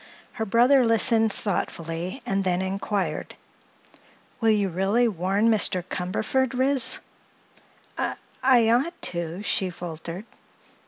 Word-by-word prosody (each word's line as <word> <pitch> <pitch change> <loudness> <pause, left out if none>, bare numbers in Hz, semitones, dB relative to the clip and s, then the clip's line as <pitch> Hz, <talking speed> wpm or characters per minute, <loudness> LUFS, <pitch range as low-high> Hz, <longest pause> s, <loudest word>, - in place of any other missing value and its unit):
Her 220 - -4
brother 245 +6 +5
listened 225 -1 +4
thoughtfully 175 - -4
and 195 -5 0
then 180 0 0
inquired: 190 -4 -3 1.0
"Will 225 -2 +2
you 210 -2 +2
really 195 +7 +1
warn 195 +2 0
Mr. 195 -4 +2
Cumberford, 215 +9 -1
Ris?" 265 -1 +2 1.0
"I—I 245 -4 +1
ought 295 +9 +1
to," 170 +2 -4
she 190 -2 0
faltered. 170 +2 -7
205 Hz, 105 wpm, -25 LUFS, 180-235 Hz, 1.0 s, brother